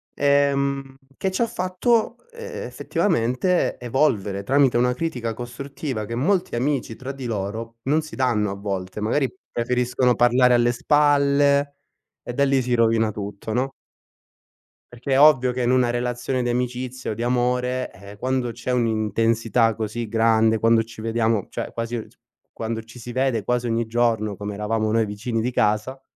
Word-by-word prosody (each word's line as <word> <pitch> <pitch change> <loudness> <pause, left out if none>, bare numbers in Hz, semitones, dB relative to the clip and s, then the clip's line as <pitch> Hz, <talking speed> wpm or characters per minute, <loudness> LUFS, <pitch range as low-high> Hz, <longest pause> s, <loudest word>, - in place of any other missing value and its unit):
Ehm, 140 -1 +1 0.2
che 190 - -1
ci 190 - -2
ha 230 - +3
fatto, 215 +3 0 0.2
ehm, 470 0 -7
effettivamente 170 - 0
evolvere, 115 -6 0
tramite 135 +1 +3
una 125 +1 +2
critica 125 -6 -3
costruttiva 125 0 -5
che 115 - -5
molti 175 +7 0
amici 125 -2 -1
tra 130 +3 -6
di 135 -2 -8
loro 115 +1 -4
non 150 +4 +2
si 155 -1 -10
danno 110 -6 +1
a - - -4
volte. 100 -1 -4
Magari, 130 +5 +1 0.2
preferiscono 125 +1 +1
parlare 125 +1 +4
alle 120 0 +4
spalle 140 +1 +3 0.5
e 120 - -6
da 140 +3 +2
lì 135 -1 +2
si 125 0 -1
rovina 115 -1 +2
tutto, 100 +1 -6
no? 130 +3 0 1.2
Perché 125 +3 -6
è 135 - +4
ovvio 135 -4 +6
che 125 0 -2
in 120 - +2
una 125 -1 +3
relazione 120 +1 -1
di 120 - -1
amicizia 125 +1 -3
o - - -1
di 115 - -6
amore, 125 +1 0
ehm, 100 +2 -12
quando 130 +1 -1
c'è 120 +2 -5
un'intensità 115 0 +1
così 115 +1 -4
grande, 110 0 +3
quando 115 +1 +4
ci 115 -1 -11
vediamo, 115 -2 0
cioè - - -5
quasi 115 -1 -3
s - - -25 0.4
quando 115 0 -4
ci 115 +2 -15
si 120 0 -8
vede 130 -3 0
quasi 125 0 0
ogni 115 0 0
giorno, 110 -2 0
come 105 0 -5
eravamo 110 +1 -1
noi 115 0 +2
vicini 110 +3 -3
di 125 +3 -1
casa, 105 +4 0
120 Hz, 165 wpm, -23 LUFS, 115-135 Hz, 1.2 s, ovvio